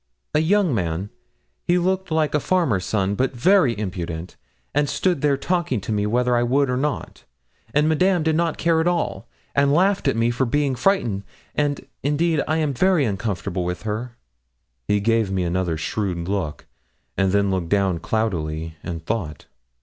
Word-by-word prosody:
'A - - +4
young 180 0 +3
man; 90 -1 -2 0.5
he 175 - +2
looked 185 +1 0
like 160 -2 +1
a 150 - +3
farmer's 140 - +1
son, 100 -2 0
but 130 +5 -1
very 140 - +4
impudent, 90 -4 -5 0.4
and 145 0 +2
stood 180 -7 0
there 145 -2 +2
talking 170 - 0
to 100 - -5
me 105 -1 0
whether 125 +2 +2
I 120 - +3
would 130 +2 +2
or - - +1
not; 140 +2 -3 0.5
and 150 +4 +3
Madame 175 +2 +3
did 160 0 +2
not 165 -1 0
care 165 -1 +2
at 165 - 0
all, 165 - -1 0.3
and 140 0 +3
laughed 190 +6 +2
at - - +2
me 115 +1 +2
for 125 +2 0
being 145 +2 +1
frightened; 120 - +1 0.3
and, 145 -1 -1 0.2
indeed, 150 +2 +1
I 155 - +1
am 155 -3 0
very 180 +1 +3
uncomfortable 95 -3 -2
with 90 +2 -4
her.' 115 +3 -4 0.7
He 105 - +2
gave 115 -1 +2
me 95 -1 0
another 85 -1 -1
shrewd 90 0 -2
look, 95 -7 -3 0.5
and 95 -1 +2
then 100 0 +2
looked 90 -3 -2
down 95 -3 +2
cloudily 80 -8 -2
and 85 -3 -6
thought. 95 -9 -3
120 Hz, 175 wpm, -22 LUFS, 95-155 Hz, 0.7 s, A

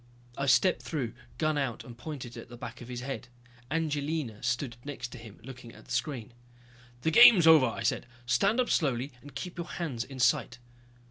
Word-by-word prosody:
I 140 - -2
stepped 180 +7 +4
through, 135 -8 -3 0.2
gun 155 -2 +1
out, 130 -5 -2
and 120 - -11
pointed 125 -2 -7
it 115 - -7
at - - -15
the 120 - -10
back 120 +1 -8
of 120 - -9
his 125 -1 -5
head. 135 -1 -5 0.4
Angelina 150 -6 -2
stood 120 0 -1
next 130 -3 -6
to - - -9
him, 110 -2 -12
looking 125 -2 -10
at - - -15
the - - -13
screen. 125 -7 -2 0.7
"The 160 - +2
game's 210 -3 +9
over," 160 -5 +8
I 115 - -4
said. - - 0 0.2
"Stand 195 - +2
up 250 - +1
slowly 135 -3 +1
and 145 - -13
keep 180 0 -6
your 170 - -4
hands 140 -10 -3
in 130 +1 -10
sight." 125 0 +2
135 Hz, 200 wpm, -29 LUFS, 120-155 Hz, 0.7 s, game's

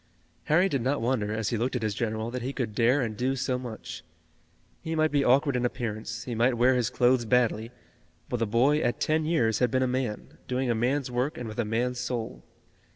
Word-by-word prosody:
Harry 175 +5 +4
did 140 -9 -1
not 135 +4 0
wonder, 115 -3 0
as 110 0 -1
he 115 - -1
looked 125 +4 -1
at 120 - -2
his 110 -1 0
general, 110 +1 -2
that 125 0 -4
he 130 +3 -3
could 120 -7 -3
dare 120 +6 +3
and 110 -3 -2
do 130 +3 0
so 125 -1 -1
much. 120 -3 -8 0.8
He 160 0 -3
might 155 0 +2
be 145 -1 +2
awkward 135 +2 +3
in 125 - 0
appearance, 110 -3 -3
he 125 - -5
might 120 +2 +2
wear 125 +2 +4
his 125 -4 +1
clothes 125 0 +3
badly, 115 -1 +1 0.6
but 125 - -2
the 115 -1 0
boy 130 +8 +3
at 120 - -1
ten 155 0 +1
years 120 -10 +1
had 125 - +3
been 130 +3 +1
a - - +1
man, 125 -4 -3
doing 125 -1 0
a - - +3
man's 125 +3 0
work 130 +6 -1
and 120 - -5
with 110 +2 -7
a 120 - +1
man's 120 +3 -1
soul. 120 -3 -4
125 Hz, 225 wpm, -27 LUFS, 115-130 Hz, 0.8 s, Harry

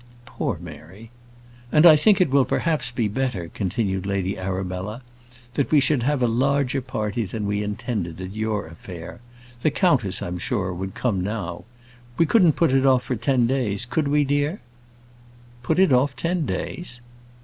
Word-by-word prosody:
Poor - - -3
Mary! 100 +8 -12 0.6
"And 150 +2 +5
I 160 -3 +10
think 205 +7 +4
it 180 -7 +3
will 140 -1 +5
perhaps 155 -3 0
be 120 -2 -1
better," 105 -6 -2
continued 95 -1 -2
Lady 100 -1 -1
Arabella, 95 +4 -4 0.5
"that 140 - 0
we 155 - +5
should 140 -1 +2
have 135 +1 +1
a - - +4
larger 135 +3 +1
party 115 -3 -2
than 105 +2 -4
we 100 0 -1
intended 105 -4 -4
at 95 +1 -6
your 110 -1 -2
affair. 85 +1 -10 0.4
The 155 - +3
countess, 140 - +1
I'm 90 0 -4
sure, 95 -2 -2
would 95 +2 -6
come 105 -7 0
now. 95 -4 -4 0.5
We 165 - +4
couldn't 175 -3 +4
put 165 -2 +2
it 135 0 +3
off 130 -2 +4
for 125 - -2
ten 120 +2 +2
days; 115 -4 -1
could 145 +4 -1
we, 145 +1 +3
dear?" 145 +6 0 1.0
"Put 160 - 0
it 190 -7 +5
off 130 +1 +2
ten 170 +1 -1
days!" 150 -9 -4
120 Hz, 170 wpm, -23 LUFS, 100-140 Hz, 1.0 s, I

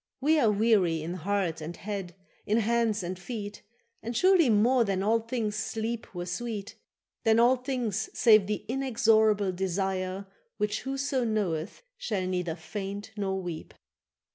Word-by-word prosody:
—We 305 +4 +3
are 230 - +4
weary 200 -7 +2
in 170 +2 -4
heart 180 -2 -1
and 165 +2 -6
head, 195 -4 -5 0.3
in 215 - +2
hands 225 -2 +1
and 180 +1 -4
feet, 205 +1 -6 0.4
And 230 +1 -4
surely 365 -5 +5
more 235 +4 +4
than 195 -3 -1
all 225 +3 +3
things 225 -2 -3
sleep 225 0 -4
were 175 0 -3
sweet, 210 +2 -4 0.5
Than 225 0 +4
all 245 +2 +6
things 245 -5 -2
save 215 -5 +6
the 210 0 -3
inexorable 220 -6 +2
desire 190 +1 -2 0.3
Which 210 0 -1
whoso 270 -1 -1
knoweth 210 - -2 0.2
shall 205 - -2
neither 180 -3 -2
faint 200 +4 -6
nor 195 -2 -1
weep. 170 -3 -7
210 Hz, 145 wpm, -28 LUFS, 190-230 Hz, 0.5 s, all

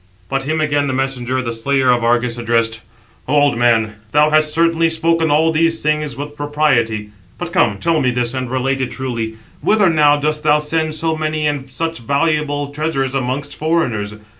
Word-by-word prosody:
But 135 0 -2
him 155 +2 -1
again 145 -2 +1
the 130 - -2
messenger, 130 -1 -1
the 115 -1 -3
slayer 130 +2 +1
of 120 -1 +1
Argus, 120 0 +1
addressed: 115 -1 0 0.5
"O 140 - 0
old 145 -3 +3
man, 110 -3 +2 0.2
thou 150 +1 +4
hast 155 0 +3
certainly 165 0 +2
spoken 165 0 +1
all 155 +2 +3
these 165 +1 +1
things 150 -3 0
with 145 +2 -7
propriety. 130 -8 0 0.3
But 175 -1 -6
come, 190 - +2
tell 165 -2 +1
me 130 - +2
this, 120 0 -1
and 130 -2 -3
relate 130 +1 -1
it 130 - -1
truly; 115 -4 -4 0.3
whither 205 -4 +3
now 150 -2 +4
dost 150 +1 -1
thou 150 -1 +4
send 155 +1 -1
so 160 0 -1
many 155 0 -2
and 140 -3 -2
such 165 0 -3
valuable 145 +2 0
treasures 145 -3 -2
amongst 135 +2 -3
foreigners? 120 -11 -1
145 Hz, 185 wpm, -17 LUFS, 125-155 Hz, 0.5 s, thou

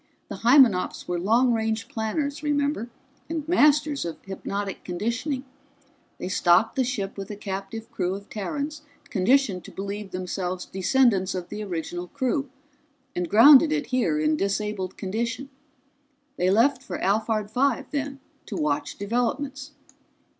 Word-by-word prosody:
"The - - -5
Hymenops 235 -6 +4
were 175 -1 -1
long 235 +7 +3
range 220 0 -1
planners, 280 +4 -2
remember, 285 -4 0 0.4
and 320 -2 -3
masters 300 -3 +3
of 170 -1 -5
hypnotic 195 +1 -4
conditioning. 235 - -2 0.7
They - - -5
stocked 185 +5 +3
the 265 - +2
ship 205 -6 -3
with 195 - -6
a 210 - -5
captive 200 +2 -6
crew 185 0 -1
of 200 +1 -9
Terrans 285 +9 -4 0.3
conditioned 215 -2 +2
to - - -10
believe 200 +1 -5
themselves 185 0 -3
descendants 190 -1 +2
of 180 -1 -5
the 210 0 -5
original 175 -1 -4
crew, 275 +3 -1 0.7
and 175 -1 -2
grounded 280 +7 +8
it 300 -1 0
here 205 -13 +1
in 155 0 +2
disabled 195 0 -2
condition. 235 +7 -3 0.8
They 180 - +1
left 245 +6 +3
for - - -5
Alphard 215 +1 0
Five 260 +1 +1
then, 285 -1 -3 0.3
to 210 - -5
watch 150 -1 -1
developments. 265 +6 -2
220 Hz, 140 wpm, -25 LUFS, 190-275 Hz, 0.8 s, grounded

